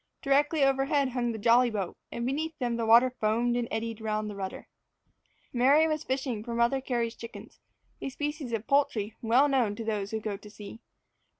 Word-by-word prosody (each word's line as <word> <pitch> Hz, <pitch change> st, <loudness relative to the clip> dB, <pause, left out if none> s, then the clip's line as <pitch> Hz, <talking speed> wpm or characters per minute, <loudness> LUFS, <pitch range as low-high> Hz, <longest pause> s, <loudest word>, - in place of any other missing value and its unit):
Directly 290 Hz, +2 st, +3 dB
over 270 Hz, 0 st, +3 dB
head 280 Hz, -1 st, +1 dB
hung 245 Hz, -1 st, -1 dB
the 225 Hz, -, -5 dB
jolly 240 Hz, +3 st, +4 dB
boat, 200 Hz, -5 st, -3 dB, 0.2 s
and 235 Hz, -, -3 dB
beneath 310 Hz, +5 st, -2 dB
them 240 Hz, -2 st, -1 dB
the 230 Hz, -1 st, -2 dB
water 240 Hz, +3 st, +6 dB
foamed 230 Hz, +3 st, +1 dB
and 240 Hz, -1 st, -1 dB
eddied 225 Hz, 0 st, -4 dB
round 215 Hz, -1 st, -2 dB
the -, -, -8 dB
rudder. 190 Hz, -1 st, -6 dB, 0.9 s
Mary 275 Hz, +6 st, +5 dB
was 310 Hz, -1 st, -2 dB
fishing 260 Hz, -5 st, -2 dB
for 235 Hz, 0 st, -5 dB
Mother 235 Hz, +3 st, +2 dB
Cary's 235 Hz, -3 st, -1 dB
chickens 230 Hz, -2 st, -11 dB, 0.4 s
a -, -, -3 dB
species 295 Hz, -1 st, -4 dB
of 225 Hz, -1 st, -2 dB
"poultry" 275 Hz, -7 st, +1 dB
well 245 Hz, +5 st, +4 dB
known 250 Hz, -7 st, +1 dB
to 225 Hz, -, -5 dB
those 210 Hz, -3 st, -2 dB
who 220 Hz, -, -2 dB
go 215 Hz, -2 st, -4 dB
to 210 Hz, -, -13 dB
sea. 210 Hz, +1 st, -10 dB
235 Hz, 195 wpm, -28 LUFS, 220-270 Hz, 0.9 s, water